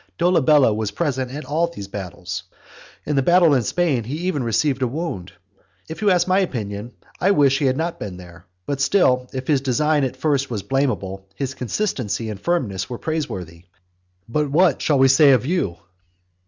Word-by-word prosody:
Dolabella 155 -8 +4
was 110 -1 -2
present 130 +1 -2
at 145 +3 -7
all 155 +5 +1
these 100 -13 -8
battles. 95 -2 -6 0.6
In 150 - -1
the 135 - +3
battle 175 +1 +5
in 130 - +3
Spain 145 -1 0
he 130 +6 -4
even 180 -6 -1
received 130 +4 0
a 130 - +2
wound. 125 - -5 0.6
If 160 - -8
you 210 - +3
ask 180 -1 +3
my 185 +1 +3
opinion, 110 - -3 0.3
I 190 - +2
wish 140 -8 +4
he 145 - 0
had 130 0 +1
not 165 +1 -2
been 95 -3 -6
there. 90 0 -14 0.2
But 140 +3 -3
still, 130 -7 +3
if 130 0 -5
his 145 -4 +2
design 145 +3 +1
at 130 0 -2
first 140 -1 0
was 105 -5 -4
blameable, 100 -8 -2
his 135 -1 -3
consistency 125 - -2
and 100 - -7
firmness 110 - -1
were 120 - -5
praiseworthy. 95 - -5 0.6
But 150 +5 -1
what 170 +5 +3
shall 150 - +2
we 135 0 +5
say 135 +1 +6
of 125 - +2
you? 150 - -1
135 Hz, 185 wpm, -21 LUFS, 110-155 Hz, 0.6 s, say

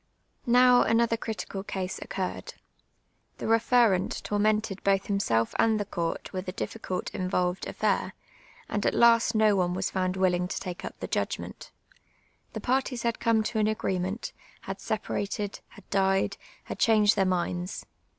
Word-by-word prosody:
Now, 250 +1 +6
another 230 0 +3
critical 220 -3 -5
ca.se 190 -2 -4
occuiTcd. 185 -1 -4 0.8
Tlie 225 +1 +2
Ixt'firnit 230 -6 +2
tonnented 210 -1 0
both 195 -1 +2
himself 115 - 0
and 220 -1 +3
the 205 - -2
court 170 -1 -4
with 185 0 -4
n - - -5
difficult 190 -5 -4
involved 185 -1 -1
afl'air, - - 0 0.5
and 205 - -2
at - - +1
last 230 -1 +5
no 215 -1 +4
one 180 -2 +1
was 190 0 -2
found 185 -1 -1
willinc 180 -1 +1
to - - -3
take 180 -2 -6
up - - -7
the - - -3
judpnent. - - -3 0.9
ITie - - -5
parties 255 -1 0
had 235 -1 -1
come 225 -1 +2
to 220 +1 -2
an 215 - +3
afjree 205 -3 -1
mcnt, 190 +5 -3 0.3
had 195 0 -7
separated, 205 -1 -3
had - - -17
died, 195 -1 +2 0.3
had - - -7
chan<je(l 215 -2 +5
their 195 - +2
minds. 180 0 -2
200 Hz, 155 wpm, -28 LUFS, 185-225 Hz, 0.9 s, Now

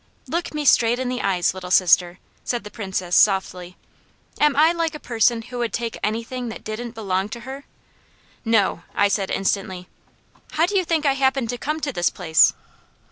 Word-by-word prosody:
"Look 340 +1 -3
me 300 -1 -2
straight 235 -2 +4
in 255 0 -2
the 250 0 -3
eyes, 180 -3 +1
Little 185 -1 -8
Sister," 180 -1 +4 0.3
said 240 -1 -2
the 210 - -10
Princess 190 -4 -3
softly. 185 -3 +2 0.6
"Am 300 -1 +3
I 310 +3 +5
like 330 -2 -2
a - - -7
person 230 -2 +1
who 245 +1 -7
would 235 -1 -1
take 230 -1 -3
anything 230 +3 -3
that 220 - -9
didn't 230 +2 -6
belong 195 -2 -2
to 235 +2 -7
her?" 270 +4 -8 0.8
"No!" 220 -7 +1
I 205 - +4
said 200 -1 -1
instantly. 190 -2 -2 0.7
"How 320 +2 +3
do 405 +3 -3
you 375 -2 +2
think 320 -2 0
I 275 - +4
happened 265 -3 +1
to 245 - -4
come 305 +2 -2
to 285 -3 -2
this 175 -4 +1
place?" 160 -4 +4
230 Hz, 190 wpm, -22 LUFS, 190-270 Hz, 0.8 s, I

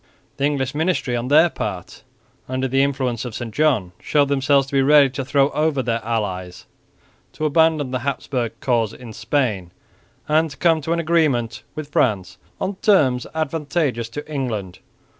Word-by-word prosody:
The 140 - +1
English 135 -2 -1
ministry 155 -5 0
on 120 +1 -2
their 155 +5 +6
part, - - -6 0.5
under 130 +1 -1
the 135 +1 +2
influence 130 -4 -1
of 120 -3 -6
St 115 -3 -6
John, 130 -12 +1
showed 145 -2 +2
themselves 140 0 +3
to 135 - -14
be 135 - +4
ready 140 -1 +5
to 135 +1 -4
throw 140 +1 +2
over 150 -3 0
their 115 -1 -1
allies, 95 -6 -3 0.7
to 155 - -3
abandon 155 -3 +2
the 130 - -1
Habsburg 125 -3 -3
cause 115 -4 +1
in 120 -3 -10
Spain, 110 -5 -1 0.6
and 160 +1 +2
to 135 - -12
come 165 -2 +3
to 160 +3 -1
an 170 - -1
agreement 150 -9 +1
with 155 -1 -7
France 105 -10 0 0.2
on 190 0 -3
terms 135 - +3
advantageous 150 -6 -1
to 145 +5 -7
England. 115 -11 -4
135 Hz, 165 wpm, -21 LUFS, 120-150 Hz, 0.7 s, their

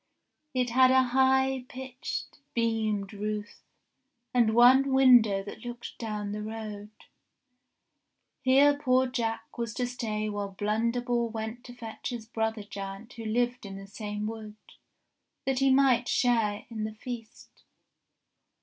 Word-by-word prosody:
It 250 -2 +1
had 255 +1 +6
a 260 0 +5
high 265 0 +2
pitched, 260 +2 -6 0.2
beamed 220 -3 0
roof, 210 +1 -4 0.7
and 230 -3 +3
one 260 +3 +6
window 245 -7 +6
that 210 +2 -9
looked 240 -1 -7
down 210 -3 -3
the 210 +1 -4
road. 210 -1 -6 1.5
Here 280 +2 +5
poor 260 -3 +2
Jack 235 -2 -3
was 230 -2 -3
to 250 - 0
stay 220 -4 -3
while 205 -1 -4
Blunderbore 235 +3 0
went 220 +2 -5
to 245 - -10
fetch 225 -1 -6
his 240 -3 -5
brother 220 -1 -2
giant 200 +2 -8
who 230 -1 -8
lived 245 +3 0
in 195 -1 -7
the 195 - -9
same 210 +1 -5
wood, 215 -1 -6 0.9
that 270 -1 +1
he 270 0 +4
might 260 -3 +4
share 225 -4 +1
in 220 -2 -4
the 215 0 -4
feast. 230 -1 -9
230 Hz, 135 wpm, -28 LUFS, 215-250 Hz, 1.5 s, had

